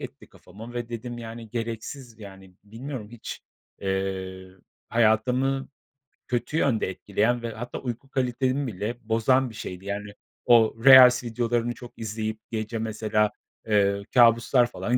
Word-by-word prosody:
etti - - -10
kafama 115 +4 -12
ve 120 -1 -4
dedim, 120 +1 -6
yani, 115 0 -8
gereksiz, 115 +1 -6
yani, 95 -3 -12
bilmiyorum 115 +1 -7
hiç, 120 -2 -8 0.4
eee, 95 -1 -3 0.4
hayatımı 125 +4 +2 0.6
kötü 125 +5 -2
yönde 120 -11 +1
etkileyen 105 +5 0
ve 115 -1 -4
hatta 120 +3 -6
uyku 125 +1 -6
kalitemi 130 +1 0
bile 110 +2 -4
bozan 130 +4 +3
bir 110 - -12
şeydi, 90 -1 -7
yani, 100 0 -5 0.3
o 115 -3 +5
reels 125 -2 +9
videolarını 120 0 -1
çok 120 0 -11
izleyip 110 0 -4
gece 110 0 -3
mesela, 105 -1 0 0.4
eee, 100 -2 +2
kabuslar 120 +1 +5
falan 120 0 -1
115 Hz, 130 wpm, -25 LUFS, 105-120 Hz, 0.6 s, reels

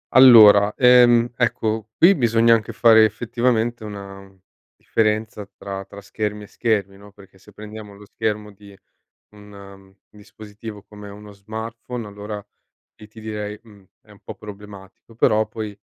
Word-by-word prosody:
Allora, 110 -5 +7
ehm 120 -2 +5
ecco, 110 -3 -2
qui 180 +4 +6
bisogna 115 - +3
anche 115 0 -1
fare 110 -1 +5
effettivamente 120 +1 -1
una 100 -2 -10 0.4
differenza 110 0 -2
tra 95 -1 -7
tra 100 +1 -13
schermi 105 +1 -5
e - - -13
schermi, 100 -4 -2
no, 100 0 -16
perché 95 -1 -20
se - - -19
prendiamo 105 -1 -11
lo 105 +1 -15
schermo 105 -1 -4
di 100 -1 -17 0.6
un 100 -2 -15 0.2
dispositivo 105 0 -12
come 105 0 -13
uno 105 +1 -13
smartphone, 110 +3 -8
allora 105 0 -8 0.6
lì 105 - -13
ti 110 +1 -16
direi: 105 -1 -6
"Mh, 105 -4 -19 0.2
è - - -22
un - - -18
po' - - -9
problematico". 105 +1 -14
Però 110 -1 +2
poi 105 -2 -7
105 Hz, 145 wpm, -21 LUFS, 100-115 Hz, 0.6 s, Allora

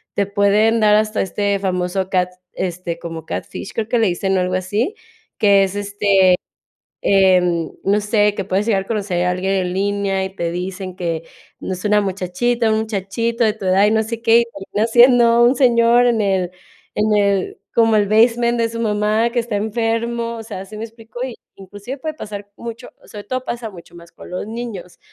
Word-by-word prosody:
te 200 - +1
pueden 205 +3 +2
dar 210 -1 +5
hasta 215 0 +1
este 200 +1 -1
famoso 185 0 -1
cat, 180 -1 +1 0.2
este, 175 -1 -4
como 165 -1 -7
Catfish - - -6
creo 220 -2 -2
que 240 +1 +1
le 225 - +3
dicen, 190 +2 0
o, - - +2
algo 180 0 -1
así, 205 - -1 0.4
que 200 -3 +5
es, 195 0 -2
este, 205 -1 +2 0.8
em, 180 -4 +3
no 200 +2 +2
sé, 210 0 +2
que 195 - -3
puedes 195 +2 0
llegar 200 -4 +2
a - - -23
conocer 195 -5 -1
a - - +2
alguien 185 +2 -1
en 185 -2 -1
línea, 195 0 0
y 190 0 -7
te 170 -2 -2
dicen 185 +1 -5
que 165 -3 -3 0.4
no 190 - -3
es 180 - -9
una 210 0 +3
muchachita, 200 +5 -1
un 215 - +2
muchachito 220 +3 -1
de 215 - +3
tu 210 -3 -7
edad, 190 +2 +4
y - - +3
no 220 0 +2
sé 230 +1 -5
qué. 230 0 +5
Y - - +1 0.3
termina 215 +2 +1
siendo 240 0 +6
un 250 +3 +4
señor 240 -1 +4
en 235 -2 +2
el 190 -3 0 0.4
en 210 0 +2
el 200 -2 +1 0.2
como 225 -1 +4
el 205 -1 +3
basement 235 +2 +3
de 230 -1 +1
su 230 0 -6
mamá 215 +1 +1
que 240 - -2
está 230 -2 -3
enfermo, 230 +2 -1
o 225 - -7
sea, 205 -4 -7
¿sí 215 - -10
me 215 - -5
explico? 230 +1 -11 0.4
Inclusive 205 +7 -8
puede 310 +3 -4
pasar 205 -7 -8
mucho 235 +1 -8 0.2
sobre 205 -1 -9
todo 255 +3 -3
pasa 235 -2 -4
mucho 175 -4 -14
más 170 0 -14
con - - -13
los 180 +2 -4
niños. 220 -5 -7
205 Hz, 200 wpm, -19 LUFS, 190-230 Hz, 0.8 s, siendo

